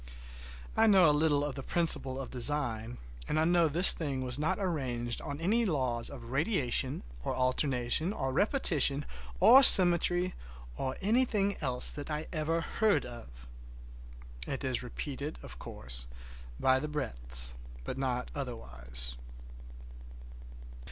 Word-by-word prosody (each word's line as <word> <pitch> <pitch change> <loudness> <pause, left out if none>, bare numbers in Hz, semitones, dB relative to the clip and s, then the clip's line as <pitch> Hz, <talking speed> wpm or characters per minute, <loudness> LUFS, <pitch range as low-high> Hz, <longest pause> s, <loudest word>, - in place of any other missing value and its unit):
I 225 0 +3
know 190 -5 +5
a 150 - +3
little 145 -1 0
of 145 - -5
the 135 - -8
principle 135 -4 +4
of 135 - -8
design, 120 -3 +2 0.3
and 155 - -2
I 160 - +1
know 170 -1 +2
this 170 +5 +5
thing 140 -5 -5
was 125 +1 -2
not 170 +5 -1
arranged 125 -10 -4
on 145 -1 -7
any 215 +8 0
laws 130 - -2
of 120 -4 -11
radiation, 135 - -1 0.2
or - - -4
alternation, 130 +5 -1
or 135 -10 -4
repetition, 150 - +1 0.3
or 265 - +7
symmetry, 180 -4 +7 0.4
or 130 - -5
anything 210 -2 0
else 125 -4 -1
that 145 +1 -8
I 150 +1 -4
ever 165 +1 -2
heard 215 +4 -1
of. 70 - -12 1.0
It 135 - -5
is 130 -2 -2
repeated, 140 +4 -7
of 65 0 -12
course, - - -6 0.5
by 130 0 +2
the 150 - -5
breadths, - - 0 0.3
but - - -6
not 125 -2 -4
otherwise. 60 - -7
140 Hz, 135 wpm, -29 LUFS, 125-165 Hz, 1.0 s, or